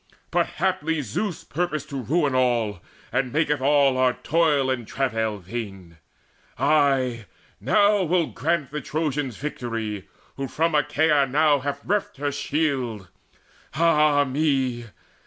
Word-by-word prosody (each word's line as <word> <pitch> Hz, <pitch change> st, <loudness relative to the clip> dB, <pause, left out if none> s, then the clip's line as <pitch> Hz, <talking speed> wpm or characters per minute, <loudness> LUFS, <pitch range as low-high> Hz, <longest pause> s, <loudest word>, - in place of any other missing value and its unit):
But -, -, +2 dB
haply 165 Hz, -4 st, 0 dB
Zeus 170 Hz, -, -3 dB
purposed 155 Hz, -2 st, -3 dB
to 135 Hz, -1 st, -3 dB
ruin 145 Hz, +3 st, +1 dB
all, 120 Hz, -6 st, +1 dB, 0.3 s
And 125 Hz, +1 st, 0 dB
maketh 150 Hz, -1 st, +1 dB
all 140 Hz, -1 st, +3 dB
our 130 Hz, -1 st, +3 dB
toil 150 Hz, -5 st, +1 dB
and 120 Hz, -4 st, -3 dB
travail 115 Hz, -5 st, -1 dB
vain 95 Hz, -4 st, -7 dB, 0.6 s
Ay, 135 Hz, -4 st, +2 dB, 0.3 s
now 205 Hz, -, +3 dB
will 175 Hz, -1 st, +2 dB
grant 155 Hz, -3 st, -2 dB
the 150 Hz, 0 st, -4 dB
Trojans 145 Hz, -6 st, -2 dB
victory 115 Hz, -8 st, -4 dB, 0.3 s
Who 135 Hz, 0 st, -3 dB
from 165 Hz, +5 st, 0 dB
Achaea 150 Hz, -1 st, +3 dB
now 145 Hz, +1 st, +3 dB
hath 140 Hz, +1 st, -4 dB
reft 205 Hz, -5 st, -1 dB
her 145 Hz, +1 st, -1 dB
shield! 135 Hz, -, -2 dB, 0.7 s
Ah 150 Hz, -3 st, +4 dB
me! 130 Hz, -4 st, 0 dB
140 Hz, 125 wpm, -24 LUFS, 125-155 Hz, 0.7 s, Ah